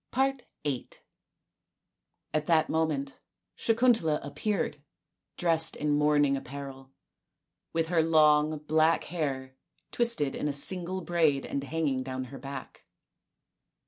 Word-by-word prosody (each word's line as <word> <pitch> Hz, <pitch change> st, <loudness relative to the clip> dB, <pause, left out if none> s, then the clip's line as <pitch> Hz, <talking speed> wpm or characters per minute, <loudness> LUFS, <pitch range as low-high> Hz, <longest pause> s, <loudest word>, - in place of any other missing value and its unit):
VIII 260 Hz, -, -2 dB, 1.4 s
At 155 Hz, -1 st, -1 dB
that 160 Hz, -2 st, +3 dB
moment 150 Hz, -4 st, -1 dB, 0.4 s
Sakuntala 225 Hz, -10 st, +2 dB
appeared, 150 Hz, +1 st, -2 dB, 0.6 s
dressed 165 Hz, -2 st, +3 dB
in 150 Hz, 0 st, -1 dB
mourning 145 Hz, -1 st, +3 dB
apparel, 135 Hz, 0 st, -8 dB, 0.8 s
with 165 Hz, 0 st, -1 dB
her 170 Hz, -2 st, +3 dB
long 155 Hz, -1 st, +4 dB
black 155 Hz, +2 st, +2 dB
hair 135 Hz, -6 st, -4 dB, 0.4 s
twisted 235 Hz, -, 0 dB
in -, -, -2 dB
a 145 Hz, -, -1 dB
single 180 Hz, +5 st, 0 dB
braid 160 Hz, -5 st, +1 dB
and 140 Hz, -, -3 dB
hanging 140 Hz, -2 st, -1 dB
down 130 Hz, 0 st, -4 dB
her 135 Hz, -, -7 dB
back. 140 Hz, 0 st, -8 dB
150 Hz, 110 wpm, -29 LUFS, 140-165 Hz, 1.4 s, long